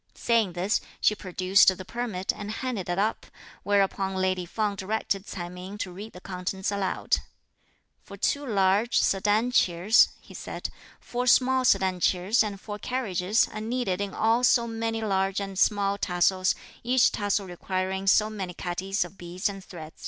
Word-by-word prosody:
Saying 225 -6 +1
this, 185 +5 0 0.2
she - - +3
produced 185 -1 +3
the 185 - -8
permit 220 -4 -2
and 210 -1 -7
handed 220 -4 -4
it 175 - -1
up, 215 +3 -1 0.3
whereupon 195 -1 +1
lady 185 -1 0
Feng 210 +2 -1
directed 200 0 -2
Ts'ai 175 -2 -5
Ming 180 +3 -8
to 185 -3 -4
read 210 +4 -9
the 180 - -10
contents 190 +1 -4
aloud. 200 -2 0 0.8
"For 200 - -12
two 285 +8 0
large, 205 -1 +2
sedan 210 +5 +2
chairs," 185 0 +4
he - - -16
said, - - -6 0.3
"four 245 +1 -3
small 260 +1 +4
sedan 190 -4 +3
chairs 185 +7 +2
and 205 -2 -5
four 205 +1 -7
carriages, 210 -4 0
are 215 - -6
needed 225 -4 -2
in 200 -2 -4
all 225 +3 +2
so 240 -1 +4
many 225 -1 -3
large 195 -1 0
and 195 -1 -5
small 200 -1 +2
tassels, 185 +1 +2 0.3
each 250 +1 +3
tassel 205 -1 -1
requiring 190 +1 -3
so 210 +2 +5
many 195 -5 -6
catties 190 +4 -2
of 195 - -14
beads 175 +3 -3
and 195 -1 -8
thread." 160 -4 -10
195 Hz, 165 wpm, -27 LUFS, 185-220 Hz, 0.8 s, so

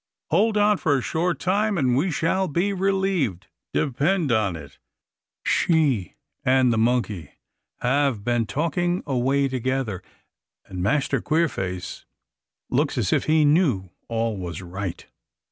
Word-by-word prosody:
Hold 210 +6 +3
on 210 0 +4
for 145 -6 +1
a - - -1
short 175 +2 0
time, 205 +2 +1
and 130 -5 +2
we 155 +9 +1
shall 185 +4 0
be 180 +6 0
relieved, 190 - 0 0.3
depend 150 +3 +1
on 105 -6 +1
it. 70 -3 -11 0.7
She 145 - +2 0.3
and 130 -1 +3
the 110 - +1
monkey 110 - 0 0.5
have 130 -4 +1
been 120 -1 0
talking 175 - -1
away 135 +1 +1
together, 130 -5 -2 0.6
and 90 -1 -6
Master 135 +4 +1
Queerface 95 - -2 0.7
looks - - +1
as - - +1
if - - +1
he 155 -1 +4
knew 145 - +2 0.2
all 115 -1 -1
was 85 -3 -5
right." 90 0 -5
135 Hz, 130 wpm, -24 LUFS, 110-170 Hz, 0.7 s, on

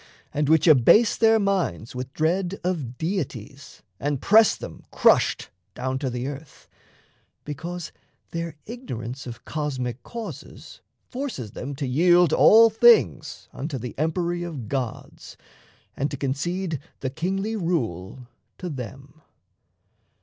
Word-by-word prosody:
and 150 0 0
which 160 -1 +4
abase 160 - +6
their 225 0 +4
minds 190 - -1
With 125 +1 -6
dread 180 +4 0
of 150 -10 -3
deities 140 - -5 0.2
and 145 -1 -1
press 220 - +5
them - - -10
crushed - - +3 0.2
Down 130 +1 -2
to 135 -2 -2
the 125 0 -4
earth, 145 +1 -8 0.8
because 170 +4 -6 0.4
their 165 -2 -4
ignorance 130 - -7
Of 115 -2 -9
cosmic 130 -5 -3
causes 230 - -9 0.3
forces 245 - -5
them 140 +6 -6
to 140 +1 -3
yield 175 +5 +4
All 225 +1 +7
things 220 - +3
unto 145 0 -4
the 125 0 -6
empery 170 +2 -1
of 150 -10 -6
gods 125 -2 -5 0.6
And 140 - -1
to - - -5
concede 165 +4 -2 0.2
the 130 - -2
kingly 195 +8 -2
rule 125 - -3 0.3
to 180 - -5
them. 135 +2 -8
150 Hz, 125 wpm, -24 LUFS, 130-180 Hz, 0.8 s, All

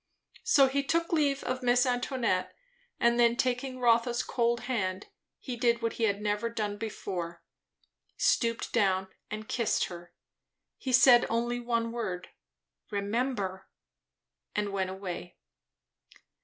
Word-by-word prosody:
So 275 -2 +5
he 275 +2 0
took 335 +4 0
leave 285 -3 +2
of 255 +1 -2
Miss 245 0 +3
Antoinette, 245 -6 0 0.4
and 235 0 +3
then, 235 0 +5
taking 255 0 -1
Rotha's 235 0 +2
cold 235 -1 0
hand, 210 -7 -2 0.3
he 255 - -6
did 235 0 +1
what 230 - 0
he 230 - 0
had 205 -1 -1
never 210 +2 0
done 215 -3 -3
before; 180 -6 -5 0.7
stooped 230 -1 +1
down 190 -4 +2 0.2
and 215 0 -6
kissed 235 -3 +1
her. 175 -1 -10 0.7
He 260 - -3
said 250 -1 +7
only 240 +1 0
one 230 -1 -1
word, 185 -7 -4 0.6
"Remember!" 200 -2 -2 0.9
and 210 -1 0
went 190 -1 -1
away. 180 -2 -6
235 Hz, 130 wpm, -29 LUFS, 200-245 Hz, 0.9 s, said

